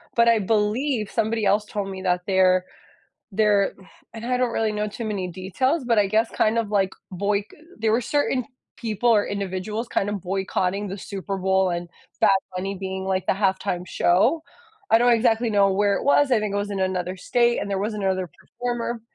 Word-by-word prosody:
but 235 0 +4
I 230 -2 +4
believe 215 +3 0
somebody 225 0 0
else 205 +2 +2
told 205 -1 -4
me 190 -1 -6
that 180 -1 +1
there 185 -1 +3 0.7
there 205 -1 +2 0.4
and 225 - -7
I 250 +1 0
don't 250 -2 +1
really 220 -2 0
know 210 0 -2
too 230 +3 -6
many 200 -4 -2
details, 225 - -1
but 235 -2 +2
I 205 - +4
guess 220 +3 +1
kind 220 +1 +1
of 225 -3 -1
like 195 -2 +2 0.2
boyc 200 +2 0 0.3
there 220 0 +1
were 230 - +3
certain 265 -1 0 0.3
people 230 +1 0
or 210 -3 +4
individuals 200 +3 -3
kind 200 - 0
of 205 -3 -3
boycotting 190 +1 -1
the 195 - -5
Super 195 0 -5
Bowl 190 0 +2
and 175 0 -3 0.3
Bad - - +5 0.3
Bunny 195 +2 -3
being, 190 0 -4
like, 190 -1 -1
the - - +3
halftime 190 -2 -1
show. 200 - +2 0.5
I 225 - +7
don't 240 +1 +4
exactly 230 0 +2
know 200 -2 +4
where 200 +1 +2
it - - -4
was, 285 0 +4
I 245 - +4
think 210 -1 -2
it - - +1
was 205 0 -2
in 200 - -3
another 185 -1 -1
state 235 +5 +1
and - - -3
there 195 -1 -1
was 210 +3 -2
another 190 -3 -1
performer 240 -1 -4
205 Hz, 200 wpm, -24 LUFS, 190-225 Hz, 0.7 s, I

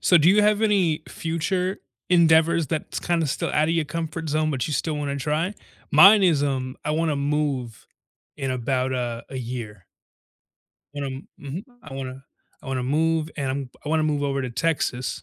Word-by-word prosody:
So 180 - +5
do 155 +2 +5
you 205 +3 +5
have 210 +1 +3
any 180 -7 +2
future 180 +3 -2 0.3
endeavors 165 -1 +4
that's 155 -2 -3
kinda 170 -3 0
still 135 - -2
outta 155 +2 +2
your 165 -2 +1
comfort 165 +1 -4
zone, 155 +1 +1
but 130 -5 -1
you 155 - -3
still 155 +3 -1
wanna 145 -1 -2
try? 155 +7 -1 0.4
Mine 200 +1 +8
is, 160 -6 +3
um, 130 -2 -2
I - - -1
wanna 155 -1 0
move 140 -5 -2 0.5
in 135 -2 -3
about 130 +1 -1
a 120 -2 -3
a 135 - -7
year. 115 -5 -6 1.1
Um 135 -1 -5
mhm, 145 +7 -6 0.2
I 155 - -11
wanna 135 0 -6 0.4
I - - -13
wanna 130 -1 -2
move 160 +4 +1
and 140 -3 -1
I'm 135 -1 -4
I - - -5
wanna 160 0 +2
move 150 -2 0
over 140 -1 -1
to 130 - -4
Texas, 130 -2 -1
150 Hz, 175 wpm, -24 LUFS, 135-165 Hz, 1.1 s, Mine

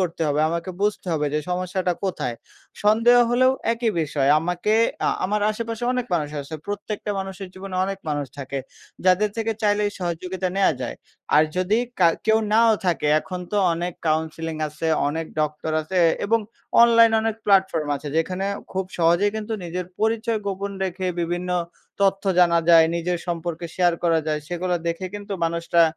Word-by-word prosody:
করতে 170 -3 -1
হবে, 145 +1 +1
আমাকে 170 +2 -3
বুঝতে 205 -2 0
হবে 150 -2 0
যে 150 - +1
সমস্যাটা 180 0 -1
কোথায়। 125 -10 -2 0.5
সন্দেহ 230 +3 +5
হলেও 255 +2 +4 0.2
একই 230 -1 0
বিষয় 145 -3 0
আমাকে 180 +5 -1 0.3
আ - - +4 0.2
আমার 210 +2 0
আশেপাশে 230 +1 -4
অনেক 250 -1 -2
মানুষ 150 -3 -1
আছে 140 +3 -8
প্রত্যেকটা 205 +1 -4
মানুষের 195 0 -6
জীবনে 190 0 -8
অনেক 195 0 -4
মানুষ 145 -1 -1
থাকে। 140 0 -4 0.5
যাদের 195 +3 +4
থেকে 225 0 0
চাইলে 210 0 +2
এই 205 - -9
সহযোগিতা 180 +1 -3
নেওয়া 195 - +4
যায়। - - -4 0.4
আর 155 - +7
যদি 185 +4 +2 0.2
কার 170 -2 +6
কেউ 220 0 +5
নাও 225 +1 +5
থাকে 165 -4 +1
এখন 180 +2 -6
তো 210 - +1 0.2
অনেক 175 +1 -3 0.2
কাউন্সেলিং 160 +1 -1
আছে 155 +2 -5 0.2
অনেক 160 +2 -3
ডক্টর 150 +1 -2
আছে 180 +4 -2 0.3
এবং 230 +3 +3 0.4
অনলাইনে 230 -1 +6
অনেক 225 0 -1
প্ল্যাটফর্ম 190 -6 +3
আছে। 145 +2 -7
যেখানে 185 +4 0 0.3
খুব 190 0 -1
সহজেই 175 +5 +3
কিন্তু 220 +1 -4
নিজের 175 +1 -4
পরিচয় 225 +1 +1
গোপন 200 0 -3
রেখে 185 0 -3
বিভিন্ন 175 +1 -2 0.5
তথ্য 195 0 +2
জানা 170 -1 +5
যায়। 165 -1 +8
নিজের 175 +1 -1
সম্পর্কে 170 -1 -3
শেয়ার 175 -2 +3
করা 165 -1 +3
যায়। 155 -1 -1
সেগুলা 180 0 -1
দেখে 170 +3 -3
কিন্তু 205 0 -6
মানুষরা 170 0 +2
180 Hz, 165 wpm, -23 LUFS, 165-205 Hz, 0.5 s, যায়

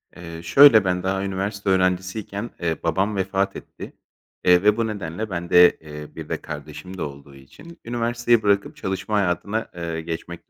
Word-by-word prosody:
Eee, 85 -1 -9
şöyle 110 +2 +7
ben 90 0 0
daha 95 +1 -1
üniversite 100 +1 -3
öğrencisiyken, 95 +4 -1
eee, 80 -2 -1
babam 95 +6 0
vefat 95 +1 -1
etti, - - -10 0.5
eee, 90 0 +5
ve 105 +1 +4
bu 115 -1 0
nedenle 105 0 -5
bende, 90 -1 +4
eee, 75 -1 -9
bir - - -8
de - - -3
kardeşim 75 +5 -8
de - - -6
olduğu 70 -1 -7
için 165 - -15
üniversiteyi 120 -1 +1
bırakıp 100 -1 +1
çalışma 95 +3 -3
hayatına, 100 +3 -1
eee, 85 -1 -4
geçmek 85 +1 -7
95 Hz, 160 wpm, -23 LUFS, 85-105 Hz, 0.5 s, şöyle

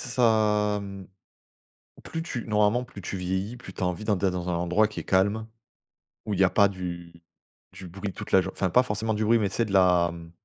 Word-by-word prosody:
ça 105 -3 +3
mmh, 100 -1 -9 1.0
plus 165 - -5
tu 125 -8 -5
normalement 105 +3 +2
plus 120 -5 -11
tu 95 - -5
vieillis 95 +5 -3
plus 120 -6 -11
tu - - -8
as - - +2
envie 90 +3 -3
d'en 105 -2 +1
d'être 95 0 0
dans 90 -1 -4
un 90 - 0
endroit 90 +5 +2
qui 110 - -9
est - - -8
calme, 100 +4 +1 0.8
où 105 - -2
il - - -4
y - - +6
a 95 - +5
pas 100 -1 +5
du 85 -3 -7 0.5
du 95 - -10
bruit 95 +2 -6
toute - - -8
la 95 - +6
jour 95 - -5
enfin 95 - -1
pas 125 +8 +4
forcément 110 -1 -2
du 110 +1 -1
bruit 115 +2 +4
mais 105 -2 0
c'est 115 +4 0
de 100 - -6
la 90 -3 +4
mmh 85 -1 -11
100 Hz, 235 wpm, -26 LUFS, 90-110 Hz, 1.0 s, y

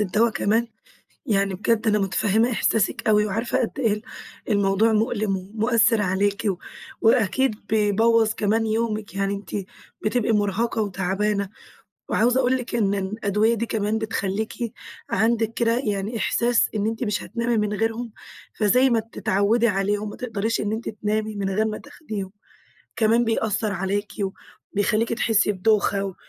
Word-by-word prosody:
الدوا 210 +4 +2
كمان! 225 +2 +1 0.6
يعني 200 -5 +1
بجد 220 +3 0
أنا 210 -1 +3
متفهِّمة 210 +4 +1
إحساسِك 220 0 0
أوي 210 -1 +4
وعارفة 225 +5 -1
قد 250 +4 -3
إيه 225 -5 +2
ال 210 - -4 0.5
الموضوع 200 +2 +3
مؤلِم 215 -3 +1
ومؤثِّر 225 +3 +2
عليكِ، 200 +2 0
و 185 - -1 0.4
وأكيد 225 +2 +3
بيبوَّظ 220 +1 +3
كمان 220 +2 +1
يومِك، 215 -2 -2
يعني 195 0 0
أنتِ، 200 -1 -7 0.5
بتبقي 225 +1 +1
مُرهَقة 215 +2 0
وتعبانة. 200 +1 -1 0.6
وعاوزة 245 +3 +3
أقول 260 0 +2
لِك 245 -1 -5
إن 200 -4 +2
إن 195 -1 -1
الأدوية 215 +1 +1
دي 235 0 -1
كمان 215 -1 -1
بتخلّيكِ، 220 -1 -2 0.6
عندِك 225 +1 +1
كده 230 0 +1
يعني 210 -1 -2
إحساس، 235 +2 +2
إن 210 -1 0
أنتِ 225 +3 -2
مش 210 -3 -1
هتنامي 235 0 -1
من 210 -1 0
غيرهم، 225 +2 -2 0.4
فزي 250 +5 +3
ما 230 -2 +3
بتتعوِّدي 220 +1 +1
عليهم، 205 +1 0
ما - - -8
تقدريش 225 -2 -2
إن 210 0 -2
أنتِ 220 +1 -3
تنامي 215 0 -2
من 195 -1 -2
غير 215 +3 +1
ما 215 -1 -2
تاخديهم، 215 -10 -7 0.7
كمان 230 +2 +3
بيأثَّر 220 -1 0
عليكِ 200 +2 -2
و 190 - -2 0.4
وبيخليكِ 215 +3 +1
تحسّي 225 -2 +2
بدوخة 200 0 +1
و 195 -2 -5
215 Hz, 150 wpm, -23 LUFS, 200-230 Hz, 0.7 s, أوي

